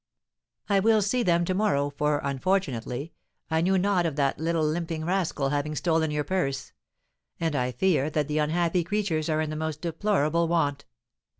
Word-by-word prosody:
"I 200 -1 +3
will 215 +1 +4
see 245 +5 +1
them 175 -5 +2
to 185 - 0
morrow, 185 -8 +1
for, 150 +1 0
unfortunately, 140 -2 -1 0.4
I 160 0 +2
knew 190 +3 +2
not 185 -2 +2
of 155 - -4
that 140 -2 0
little 165 0 0
limping 160 0 -2
rascal 170 -6 0
having 145 +2 -1
stolen 160 -1 +1
your 150 0 -1
purse; 145 -4 -2 0.7
and 165 -3 -1
I 125 -2 0
fear 150 +2 +1
that 150 -2 -1
the 150 0 0
unhappy 170 +3 +1
creatures 170 -4 -1
are 155 0 +1
in 155 -1 -2
the - - -4
most 155 -1 -3
deplorable 170 -2 +1
want. 145 -4 0
160 Hz, 175 wpm, -26 LUFS, 150-180 Hz, 0.7 s, will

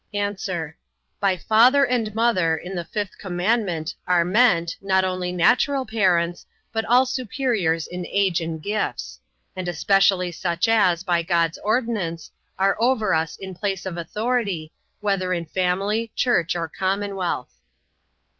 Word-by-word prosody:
A. 205 0 -1 0.8
By 195 -2 +1
father 245 - +5
and 230 -4 -1
mother, 185 -9 +2
in 180 +4 -7
the 175 -2 -3
fifth 205 -1 -5
commandment, 180 -3 -1
are 175 -2 +3
meant, 180 -4 +3
not 190 -1 +2
only 185 -1 -2
natural 250 +9 +2
parents, 175 -6 +1 0.3
but 225 0 0
all 250 +3 +5
superiors 230 - -1
in 180 0 -6
age 190 -4 +1
and 165 -1 -4
gifts; 210 +1 -3 0.4
and 185 -1 -4
especially 185 +1 +2
such 170 +3 -1
as, 190 -6 +3
by 175 -3 +1
God's 170 -1 0
ordinance, 210 -8 -2 0.3
are 195 +1 +2
over 225 -4 +2
us 160 -1 -1
in 190 -1 -8
place 195 +1 -3
of 185 -2 -4
authority, 200 -2 -2 0.3
whether 195 -3 0
in 170 -1 -2
family, 195 +6 -1
church, 180 -10 +1
or 170 -1 -2
commonwealth. 190 -4 -2
190 Hz, 135 wpm, -23 LUFS, 175-220 Hz, 0.8 s, father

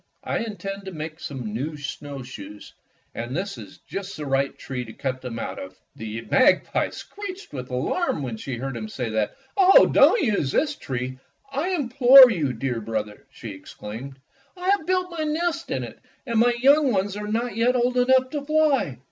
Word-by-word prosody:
"I - - -1
intend 195 -2 -5
to 190 - -6
make 155 -1 -6
some 125 -10 -6
new 150 +7 -3
snowshoes, 135 -7 -8 0.4
and 120 +5 -4
this 195 +2 -3
is - - -11
just 200 0 -6
the 150 - -5
right 135 0 0
tree 125 -2 -5
to 110 -2 -10
cut 130 -1 -3
them 125 -3 -6
out - - -5
of." 95 0 -9 0.2
The 110 +1 -6
magpie 255 - +3
screeched 395 - -8
with 125 -2 -6
alarm 140 - -1
when 120 -4 -4
she 125 +4 -5
heard 135 +1 -4
him 110 -2 -5
say 125 +1 -4
that. 110 -1 -1 0.2
"Oh, 385 -1 +7
don't 475 - +5
use 210 - +1
this 295 -2 +1
tree, 130 - -5 0.3
I 285 +7 -1
implore 265 -5 +8
you, 155 - 0
dear 125 -1 -3
brother!" 110 -1 -4
she 115 -4 -8
ex 95 - -13
claimed. 125 +6 -8 0.2
" - - -34
I 360 +1 -2
have 395 -5 +2
built 365 -1 0
my 330 -2 -3
nest 325 +2 -1
in - - -2
it, - - -9 0.3
and 235 -3 0
my 240 +1 +4
young 280 +2 +5
ones 200 -1 0
are 210 0 -5
not 230 +1 -2
yet 240 +3 +2
old 250 0 +1
enough 255 +1 +3
to 295 - -2
fly." 295 - +2
190 Hz, 195 wpm, -24 LUFS, -, 0.4 s, implore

